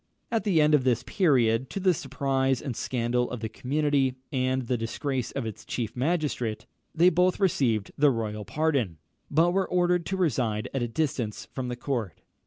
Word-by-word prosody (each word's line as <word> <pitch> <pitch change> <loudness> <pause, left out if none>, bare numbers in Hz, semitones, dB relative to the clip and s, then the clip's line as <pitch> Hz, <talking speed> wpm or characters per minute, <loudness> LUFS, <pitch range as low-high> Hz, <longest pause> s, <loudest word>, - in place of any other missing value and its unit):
At 225 -1 0
the 185 -6 +3
end 150 0 +4
of 145 -4 +4
this 125 -1 +1
period, 130 - +2
to - - -4
the 185 -1 +3
surprise 135 -2 0
and 130 -5 -5
scandal 125 0 -1
of 120 -1 -5
the 110 - -2
community, 140 0 0 0.2
and 130 -1 0
the 125 +1 -1
disgrace 125 +3 -2
of 135 -4 -3
its 110 -3 -6
chief 115 -3 -4
magistrate, 125 -6 -1 0.3
they 175 +3 +5
both 180 +2 +2
received 125 - +1
the 145 0 +6
royal 110 -4 -2
pardon, 135 - 0 0.3
but 165 +4 +3
were 190 +1 0
ordered 180 -1 +2
to 190 - -2
reside 120 - 0
at 135 - -1
a 120 - 0
distance 120 -5 -2
from 130 -2 -3
the 125 - -3
court. 120 - -3
130 Hz, 185 wpm, -27 LUFS, 120-155 Hz, 0.3 s, the